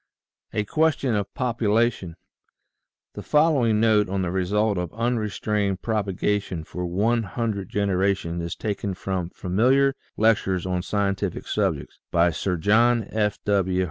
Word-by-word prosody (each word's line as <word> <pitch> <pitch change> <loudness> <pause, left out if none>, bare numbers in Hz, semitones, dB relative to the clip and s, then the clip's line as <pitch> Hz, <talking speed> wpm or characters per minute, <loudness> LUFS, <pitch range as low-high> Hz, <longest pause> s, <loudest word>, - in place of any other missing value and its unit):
A 105 - -1
QUESTION 155 0 +1
OF 100 -2 -1
POPULATION 115 -6 0 1.0
HE - - -7
following 140 -8 +3
note 110 -3 +3
on 95 0 -1
the 85 - -2
result 100 +2 +1
of 90 -2 -4
unrestrained 105 -4 -1
propagation 100 -4 -1
for 90 +2 -5
one 110 +7 +1
hundred 100 -1 -3
generations 95 -3 0
is 85 0 -4
taken 100 -2 -3
from 95 -2 -3
"Familiar 130 +11 +2 0.2
Lectures 100 -5 +2
on 90 -1 -1
Scientific 100 -1 -2
Subjects," - - -2
by 85 0 +3
Sir 90 +2 -2
John 115 +5 +3
F. 105 -2 0
W. 95 -2 +1
100 Hz, 130 wpm, -24 LUFS, 95-115 Hz, 1.0 s, following